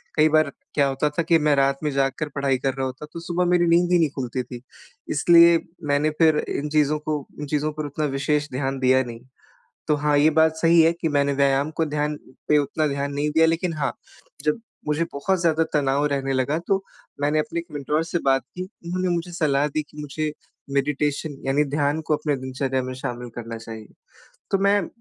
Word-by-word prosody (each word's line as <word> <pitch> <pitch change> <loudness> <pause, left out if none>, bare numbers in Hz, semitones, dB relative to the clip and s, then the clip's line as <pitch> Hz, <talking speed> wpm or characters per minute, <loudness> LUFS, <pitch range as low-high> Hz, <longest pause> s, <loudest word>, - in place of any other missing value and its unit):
कई 155 0 +5
बार 155 -2 +3 0.2
क्या 140 -2 +3
होता 135 +2 0
था 165 +3 -1
कि 165 0 +4
मैं 150 -1 +3
रात 135 0 +2
में 150 - 0
जाग 135 0 +1
कर 155 - -2
पढ़ाई 140 -2 +1
कर 135 +1 -1
रहा 135 0 -2
होता 130 +3 -6
तो 170 - -5
सुबह 175 +1 -1
मेरी 175 -1 +3
नींद 175 +1 +3
ही 175 - +5
नहीं 160 -3 +3
खुलती 125 -1 -3
थी। 125 -1 -9 0.5
इसलिए 170 +2 +6 0.3
मैंने 145 +2 +2
फिर 160 -2 +5
इन 150 +1 -3
चीज़ों 150 0 +2
को 150 -2 -3
इन 150 - -4
चीज़ों 150 +1 0
पर 155 0 -4
उतना 145 +2 -2
विशेष 145 +1 0
ध्यान 135 +1 -2
दिया 130 0 +4
नहीं। 115 -2 -8 0.7
तो 150 - +3
हाँ, 150 0 +1
ये 150 +2 +5
बात 160 0 +3
सही 165 +1 +5
है 165 +1 +5
कि 165 - +1
मैंने 140 -1 +1
व्यायाम 140 +2 +2
को 160 - +2
ध्यान 150 0 -1 0.3
पे 150 - +4
उतना 150 +2 0
ध्यान 140 0 -2
नहीं 145 +1 0
दिया। 160 +2 +4
लेकिन 165 +2 0
हाँ, 150 -3 -2 0.5
जब 150 +7 +1 0.3
मुझे 150 +2 +1
बहुत 180 +6 0
ज़्यादा 165 -1 +3
तनाव 140 0 +2
रहने 135 -1 -1
लगा 130 +4 0
तो 195 0 +1 0.4
मैंने 150 +2 +2
अपने 170 +2 -2
एक 170 - -7
मेंटर 150 +2 -1
से 165 +1 -2
बात 135 0 +3
की 180 - -4
उन्होंने 185 -1 -4
मुझे 170 +1 -4
सलाह 150 -4 +1
दी 150 +1 -2
कि - - -17
मुझे 150 +1 -3 0.4
मेडिटेशन 145 +1 -1
यानी 140 +2 +2
ध्यान 145 +1 0
को 150 - +3
अपने 150 -1 -1
दिनचर्या 130 0 -2
में 130 - -5
शामिल 120 0 -5
करना 115 -1 -6
चाहिए। 110 -1 -9 0.6
तो 195 - +2
मैं 200 -1 +2
150 Hz, 210 wpm, -23 LUFS, 140-160 Hz, 0.7 s, इसलिए